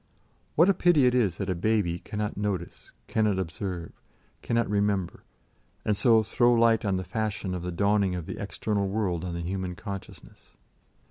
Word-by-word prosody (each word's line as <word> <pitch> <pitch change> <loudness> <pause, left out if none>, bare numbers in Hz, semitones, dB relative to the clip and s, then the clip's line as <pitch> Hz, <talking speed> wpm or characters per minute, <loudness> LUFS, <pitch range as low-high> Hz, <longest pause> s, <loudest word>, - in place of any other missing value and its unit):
What 165 +4 +6
a 200 - +5
pity 175 -7 +4
it 125 - +4
is 105 -9 +2
that 100 - -3
a 95 - +1
baby 90 -2 0
cannot 105 0 -4
notice, 100 -4 -4 0.2
cannot 105 -3 +1
observe, 90 0 -4 0.5
cannot 115 -1 0
remember, 100 -3 0 0.6
and 105 - +2
so 110 +1 +4
throw 120 +3 +3
light 115 -1 +4
on 100 -3 +1
the 95 - -3
fashion 100 0 -3
of 90 - -3
the 90 +1 -4
dawning 100 +1 +2
of 85 -3 -4
the - - -6
external 100 -2 -1
world 95 -4 -1
on 90 -2 -4
the 85 - -3
human 90 +1 -3
consciousness. 100 0 -10
100 Hz, 175 wpm, -27 LUFS, 90-110 Hz, 0.6 s, What